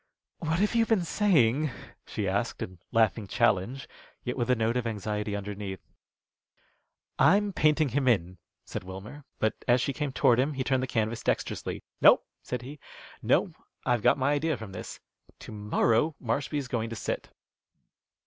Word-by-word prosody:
"What 160 Hz, 0 st, 0 dB
have 205 Hz, +4 st, +1 dB
you 230 Hz, -1 st, +3 dB
been 215 Hz, -6 st, +2 dB
saying?" 155 Hz, -, +3 dB, 0.4 s
she -, -, -3 dB
asked, -, -, -1 dB
in 90 Hz, -1 st, -9 dB
laughing 110 Hz, -2 st, +2 dB
challenge, 120 Hz, +4 st, +1 dB, 0.4 s
yet 125 Hz, -, -3 dB
with 120 Hz, -2 st, -1 dB
a 125 Hz, -, +5 dB
note 115 Hz, +1 st, 0 dB
of 125 Hz, -2 st, 0 dB
anxiety 105 Hz, -1 st, -3 dB
underneath. 100 Hz, -1 st, -5 dB, 1.4 s
"I'm 200 Hz, +2 st, +4 dB
painting 155 Hz, -2 st, +3 dB
him 135 Hz, 0 st, 0 dB
in," 90 Hz, -6 st, +1 dB, 0.3 s
said -, -, -5 dB
Wilmer; 100 Hz, +10 st, -9 dB
but 110 Hz, -, +1 dB
as 120 Hz, 0 st, +5 dB
she 135 Hz, +2 st, -1 dB
came 145 Hz, 0 st, -2 dB
toward 120 Hz, -2 st, +4 dB
him 140 Hz, +4 st, +1 dB
he 130 Hz, -1 st, -2 dB
turned 130 Hz, -1 st, +1 dB
the 130 Hz, -, -2 dB
canvas 115 Hz, -1 st, -1 dB
dexterously. -, -, -2 dB, 0.2 s
"No," -, -, +8 dB, 0.2 s
said 125 Hz, -1 st, -4 dB
he, 140 Hz, +3 st, -9 dB, 0.4 s
"no. -, -, +2 dB, 0.3 s
I've 120 Hz, -2 st, +2 dB
got -, -, +4 dB
my 135 Hz, +1 st, +1 dB
idea 155 Hz, 0 st, 0 dB
from 110 Hz, -3 st, -8 dB
this. 95 Hz, -, -8 dB, 0.4 s
To -, -, -9 dB
morrow 110 Hz, +7 st, +1 dB
Marshby's 140 Hz, +3 st, -2 dB
going 115 Hz, -2 st, -2 dB
to 115 Hz, -, -5 dB
sit." -, -, -4 dB
125 Hz, 165 wpm, -28 LUFS, 110-145 Hz, 1.4 s, No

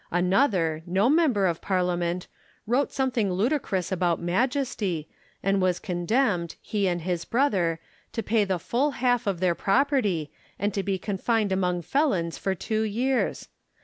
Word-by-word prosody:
Another, 180 Hz, -, +2 dB
no 195 Hz, +8 st, +3 dB
member 290 Hz, -, +3 dB
of 170 Hz, -3 st, 0 dB
Parliament, 180 Hz, -2 st, 0 dB, 0.4 s
wrote 250 Hz, +6 st, +1 dB
some 265 Hz, -1 st, 0 dB
thing 215 Hz, -6 st, 0 dB
ludicrous 195 Hz, -, 0 dB
about 175 Hz, -2 st, +1 dB
Majesty, 195 Hz, -, -1 dB, 0.4 s
and 195 Hz, 0 st, +2 dB
was 180 Hz, -1 st, +2 dB
condemned, 180 Hz, -1 st, 0 dB
he 205 Hz, -3 st, -1 dB
and 175 Hz, -1 st, -1 dB
his 175 Hz, -1 st, -1 dB
brother, 190 Hz, -, +1 dB, 0.3 s
to 225 Hz, -, -3 dB
pay 220 Hz, -1 st, +2 dB
the 190 Hz, -2 st, 0 dB
full 270 Hz, -, 0 dB
half 245 Hz, -3 st, +1 dB
of 190 Hz, -4 st, 0 dB
their 180 Hz, -1 st, +2 dB
property, 205 Hz, -, +1 dB, 0.3 s
and 205 Hz, +1 st, -1 dB
to 195 Hz, -, 0 dB
be 195 Hz, 0 st, -1 dB
confined 205 Hz, +2 st, 0 dB
among 180 Hz, -2 st, 0 dB
felons 185 Hz, -, 0 dB
for 190 Hz, -1 st, -1 dB
two 215 Hz, +4 st, -2 dB
years 240 Hz, +5 st, 0 dB
195 Hz, 150 wpm, -26 LUFS, 175-240 Hz, 0.4 s, no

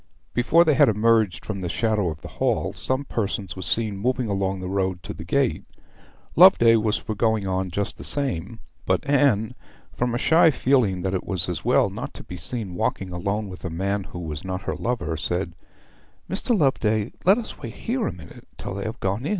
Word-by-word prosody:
Before 165 Hz, +8 st, +4 dB
they 155 Hz, -, +4 dB
had 130 Hz, -, +5 dB
emerged 110 Hz, -3 st, +2 dB
from 100 Hz, -3 st, -4 dB
the 90 Hz, -, -3 dB
shadow 105 Hz, -2 st, +1 dB
of 80 Hz, -1 st, -8 dB
the -, -, -6 dB
hall -, -, +1 dB
some 130 Hz, +2 st, -2 dB
persons 100 Hz, -5 st, -3 dB
were 95 Hz, -, -7 dB
seen 105 Hz, 0 st, 0 dB
moving 125 Hz, +2 st, 0 dB
along 95 Hz, -1 st, -1 dB
the 90 Hz, -, -5 dB
road. 95 Hz, -1 st, -1 dB, 1.4 s
Loveday 115 Hz, -1 st, +7 dB
was 110 Hz, 0 st, +1 dB
for 110 Hz, -, -4 dB
going 110 Hz, -1 st, +1 dB
on 95 Hz, 0 st, -1 dB
just 100 Hz, +4 st, -3 dB
the -, -, -7 dB
same; 115 Hz, -, -3 dB, 0.3 s
but -, -, +1 dB
Anne, 130 Hz, -7 st, +3 dB, 0.4 s
from 120 Hz, -1 st, -1 dB
a -, -, +1 dB
shy 160 Hz, +5 st, +5 dB
feeling 125 Hz, -, +2 dB
that 95 Hz, 0 st, -1 dB
it 95 Hz, -, -1 dB
was 95 Hz, -2 st, 0 dB
as 90 Hz, -3 st, -4 dB
well -, -, +3 dB
not -, -, -6 dB
to -, -, -8 dB
be 90 Hz, -, -8 dB
seen 95 Hz, +3 st, -3 dB
walking 90 Hz, +1 st, -2 dB
alone 100 Hz, +4 st, -2 dB
with 90 Hz, -1 st, -10 dB
a 90 Hz, -, -3 dB
man 95 Hz, +4 st, -2 dB
who -, -, -9 dB
was 80 Hz, -4 st, -5 dB
not 95 Hz, 0 st, -4 dB
her -, -, -2 dB
lover, 115 Hz, -9 st, -2 dB
said 85 Hz, +3 st, -2 dB, 0.7 s
'Mr. 215 Hz, +4 st, +1 dB
Loveday, 110 Hz, -, +1 dB
let 195 Hz, +4 st, +6 dB
us 235 Hz, -, -6 dB
wait -, -, -7 dB
here 240 Hz, -1 st, -2 dB
a -, -, -1 dB
minute 85 Hz, -5 st, -13 dB
till -, -, -5 dB
they 100 Hz, +2 st, -4 dB
have 110 Hz, -, -5 dB
passed.' 100 Hz, +8 st, -1 dB
105 Hz, 200 wpm, -24 LUFS, 95-120 Hz, 1.4 s, Loveday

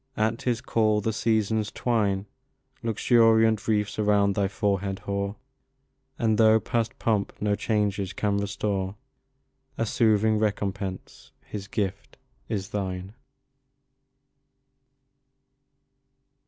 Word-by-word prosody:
at 110 Hz, +2 st, 0 dB
his 120 Hz, -2 st, 0 dB
call 110 Hz, -3 st, +2 dB
the 110 Hz, +2 st, -1 dB
Seasons 110 Hz, -1 st, 0 dB
twine 105 Hz, -5 st, 0 dB, 0.6 s
Luxuriant 115 Hz, -1 st, +3 dB
wreaths 105 Hz, -1 st, 0 dB
around 105 Hz, -1 st, +3 dB
thy 100 Hz, 0 st, +1 dB
forehead 100 Hz, -1 st, -1 dB
hoar; 100 Hz, +1 st, -3 dB, 0.8 s
And, 110 Hz, -2 st, +1 dB
though 110 Hz, 0 st, +6 dB
past 115 Hz, 0 st, -2 dB
pomp 105 Hz, -3 st, 0 dB
no 105 Hz, 0 st, +1 dB
changes 100 Hz, -3 st, 0 dB
can 100 Hz, -1 st, 0 dB
restore, 100 Hz, -1 st, -2 dB, 0.8 s
A 115 Hz, -, 0 dB
soothing 110 Hz, -1 st, +2 dB
recompence, 100 Hz, -3 st, -3 dB
his 100 Hz, -1 st, -7 dB
gift, 100 Hz, -2 st, -3 dB, 0.3 s
is 95 Hz, -2 st, -3 dB
thine! 95 Hz, -1 st, -4 dB
105 Hz, 100 wpm, -26 LUFS, 100-110 Hz, 0.8 s, though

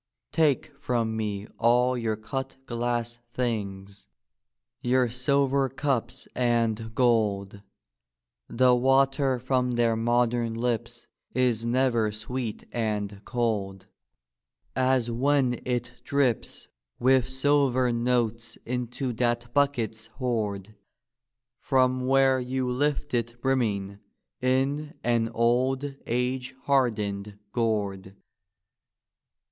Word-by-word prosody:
Take 150 Hz, -4 st, +2 dB
from 115 Hz, -5 st, -1 dB
me 105 Hz, -2 st, -3 dB
all 125 Hz, +2 st, +4 dB
your 115 Hz, -3 st, -1 dB
cut 135 Hz, +5 st, -5 dB
glass 120 Hz, -1 st, -2 dB
things; 100 Hz, -5 st, -4 dB, 0.7 s
your 125 Hz, 0 st, +2 dB
silver 135 Hz, +2 st, +1 dB
cups 135 Hz, -2 st, -2 dB
and 115 Hz, -2 st, 0 dB
gold; 105 Hz, -5 st, +1 dB, 0.9 s
The 125 Hz, +1 st, +4 dB
water 135 Hz, +1 st, +3 dB
from 125 Hz, 0 st, 0 dB
their 120 Hz, -1 st, +2 dB
modem 120 Hz, 0 st, +1 dB
lips 115 Hz, -1 st, -2 dB, 0.3 s
is 120 Hz, -3 st, +1 dB
never 120 Hz, -3 st, +2 dB
sweet 110 Hz, +1 st, -5 dB
and 105 Hz, -3 st, -2 dB
cold 100 Hz, -5 st, -2 dB, 0.9 s
As 130 Hz, -2 st, +2 dB
when 130 Hz, 0 st, +1 dB
it 120 Hz, -1 st, -2 dB
drips 135 Hz, -5 st, 0 dB, 0.3 s
with 130 Hz, 0 st, +3 dB
silver 130 Hz, -2 st, +2 dB
notes 115 Hz, -1 st, 0 dB
into 125 Hz, +1 st, -3 dB
that 120 Hz, 0 st, -1 dB
bucket's 115 Hz, -6 st, 0 dB
hoard. 110 Hz, -4 st, -3 dB, 0.9 s
From 130 Hz, -1 st, +2 dB
where 135 Hz, 0 st, +4 dB
you 130 Hz, +1 st, -2 dB
lift 140 Hz, +3 st, -1 dB
it 120 Hz, 0 st, -1 dB
brimming 105 Hz, -7 st, 0 dB, 0.4 s
in 140 Hz, +5 st, 0 dB
an 115 Hz, -1 st, +1 dB
old 130 Hz, +4 st, +1 dB
age 125 Hz, +2 st, -1 dB
hardened 105 Hz, -7 st, 0 dB
gourd. 100 Hz, -5 st, -1 dB
120 Hz, 95 wpm, -27 LUFS, 115-130 Hz, 0.9 s, all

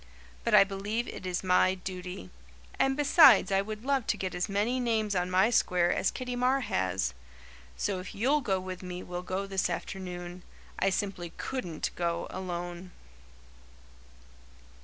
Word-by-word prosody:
But -, -, +3 dB
I -, -, +9 dB
believe 200 Hz, +4 st, -3 dB
it 185 Hz, -, -7 dB
is 180 Hz, 0 st, -2 dB
my 185 Hz, 0 st, +4 dB
duty; 180 Hz, -, -7 dB, 0.5 s
and 270 Hz, 0 st, +2 dB
besides 295 Hz, -, +7 dB
I 195 Hz, 0 st, +3 dB
would 215 Hz, +3 st, -7 dB
love 275 Hz, -3 st, +1 dB
to -, -, +1 dB
get 185 Hz, -1 st, -3 dB
as 180 Hz, +3 st, -2 dB
many 210 Hz, +6 st, 0 dB
names 220 Hz, -4 st, 0 dB
on 180 Hz, 0 st, 0 dB
my 190 Hz, +5 st, +3 dB
square 180 Hz, -6 st, +3 dB
as -, -, +1 dB
Kitty 250 Hz, -1 st, -4 dB
Marr 255 Hz, +2 st, +2 dB
has. 95 Hz, -, -1 dB, 0.6 s
So 195 Hz, -2 st, -1 dB
if 185 Hz, -, -8 dB
you'll 270 Hz, +8 st, +2 dB
go 195 Hz, -6 st, 0 dB
with 185 Hz, -1 st, -6 dB
me 180 Hz, -1 st, -6 dB
we'll 180 Hz, 0 st, -5 dB
go 185 Hz, +2 st, -3 dB
this 195 Hz, -1 st, 0 dB
afternoon. 180 Hz, -1 st, -5 dB, 0.4 s
I 195 Hz, -, +3 dB
simply 190 Hz, -3 st, -3 dB
COULDN'T 180 Hz, -12 st, -3 dB
go 170 Hz, -1 st, -1 dB
alone." 175 Hz, -1 st, -5 dB
190 Hz, 160 wpm, -29 LUFS, 180-220 Hz, 0.6 s, I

